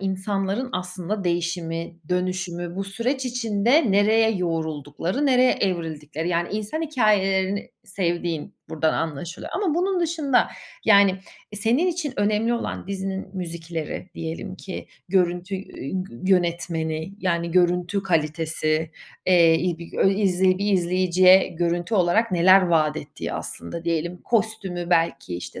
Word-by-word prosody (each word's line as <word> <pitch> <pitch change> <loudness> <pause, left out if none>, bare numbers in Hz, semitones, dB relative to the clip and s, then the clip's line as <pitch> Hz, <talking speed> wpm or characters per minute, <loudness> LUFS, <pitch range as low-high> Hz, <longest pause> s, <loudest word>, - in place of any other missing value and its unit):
insanların 195 +4 -1
aslında 185 +2 -3
değişimi, 170 -1 -2
dönüşümü, 180 -1 -2
bu 195 - -2
süreç 245 +7 -2
içinde 235 +1 +2
nereye 220 +3 +4
yoğruldukları, 165 - -2
nereye 255 -1 +5
evrildikleri, 160 -3 -2
yani, 170 0 0
insan 215 +9 -3
hikâyelerini 200 -9 +1
sevdiğin 170 -4 -2
buradan 160 0 +1
anlaşılıyor 165 +2 -4
ama 370 -6 0
bunun 370 +1 +1
dışında 315 -6 +2 0.4
yani, 200 -3 +6 0.4
eee, 210 - -4
senin 235 - +2
için 340 -6 -2
önemli 215 +3 +1
olan 235 - -4
dizinin 195 0 -4
müzikleri 170 -1 -5
diyelim 165 +4 -5
ki, 190 - -7 0.2
görüntü, 180 0 +1
ü 185 -7 -8
gü 120 -11 -12
yönetmeni, 170 -1 -1
yani, 170 -3 -1
görüntü 180 +2 +2
kalitesi, 160 -2 0 0.4
eee, 170 -3 +6
i 175 -2 -1
bi 170 -1 -10
gö - - +3
izley 190 -2 +2
bir 205 0 0
izleyiciye 185 +1 +4
görüntü 175 +4 -1
olarak 200 +5 +2
neler 185 +2 +6
vaat 155 -4 +2
ettiği, 145 -2 -6
aslında 165 - -4
diyelim, 170 +1 -2
kostümü 205 -6 -1
belki, 165 - +1
işte, 90 - -8
185 Hz, 125 wpm, -24 LUFS, 170-205 Hz, 0.4 s, yani